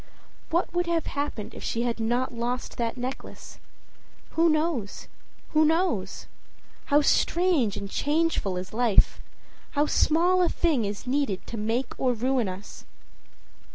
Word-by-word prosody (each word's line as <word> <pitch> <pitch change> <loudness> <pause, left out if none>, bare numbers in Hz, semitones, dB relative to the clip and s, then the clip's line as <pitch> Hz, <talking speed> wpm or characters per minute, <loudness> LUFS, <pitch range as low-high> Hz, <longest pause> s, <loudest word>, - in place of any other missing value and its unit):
What 335 +1 0
would 350 0 0
have 335 -2 0
happened 285 -7 -4
if - - -9
she 230 - -1
had 235 -1 -1
not 240 +3 0
lost 240 +1 -3
that 235 +1 -2
necklace? 255 +2 -7 0.7
Who 330 +1 +3
knows? 305 -9 -1 0.4
who 310 0 +4
knows? 315 - 0 0.6
How 295 0 +4
strange 325 - +2
and 200 - -4
changeful 290 - 0
is 180 +2 -6
life! 230 -2 +3 0.6
How 295 - +4
small 345 +5 +3
a 350 - +3
thing 300 -10 +1
is 200 +3 -5
needed 255 -7 -1
to - - -7
make 225 +4 -1
or 255 -2 +2
ruin 245 -2 0
us! 185 +2 -9
255 Hz, 140 wpm, -26 LUFS, 225-320 Hz, 0.7 s, who